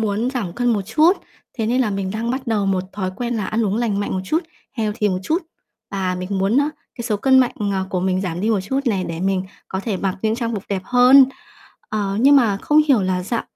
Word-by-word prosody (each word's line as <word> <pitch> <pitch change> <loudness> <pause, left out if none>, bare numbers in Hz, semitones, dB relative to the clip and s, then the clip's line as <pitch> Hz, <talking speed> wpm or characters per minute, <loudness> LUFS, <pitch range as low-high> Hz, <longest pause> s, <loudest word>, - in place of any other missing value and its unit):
muốn 220 +3 0
giảm 230 -10 -3
cân 245 +4 +1
một 205 -3 0
chút. 305 - +4 0.5
Thế 220 - 0
nên 250 +3 +1
là 220 -5 +1
mình 195 -1 -2
đang 225 +3 -2
bắt 260 0 -3
đầu 210 -3 0
một 190 -1 +1
thói 190 -2 -3
quen 240 -1 -2
là 210 - -2
ăn 220 +1 0
uống 200 +1 0
lành 220 -4 0
mạnh 205 - -2
một 185 - -1
chút, 315 - 0 0.3
healthy 215 -3 -1
một 185 -2 -1
chút, 325 - 0 0.5
và 190 -2 -1
mình 180 +1 -5
muốn 195 +5 +1
á, 285 +1 +2 0.3
cái 240 - -6
số 215 -3 0
cân 260 +5 +4
mạnh, 255 -2 +3 0.2
ờ, 190 -1 -1
của 180 - -1
mình 185 0 0
giảm 175 -3 -3
đi 215 +3 +1
một 210 -4 +2
chút 265 +9 -1
này, 195 -6 +1
để 165 -1 -5
mình 190 0 0 0.3
có 190 - -3
thể 205 -1 -2
mặc 190 0 -2
những 220 0 +1
trang 230 -1 -2
phục 200 - -4
đẹp 195 -2 -2
hơn. 250 +3 +7 0.6
Ờ, 200 -2 -2
nhưng 280 +3 +6
mà 225 -7 +3
không 300 +9 +3
hiểu 250 -8 +4
là 185 -1 0
dạo 230 +5 -2
210 Hz, 255 wpm, -20 LUFS, 190-245 Hz, 0.6 s, hơn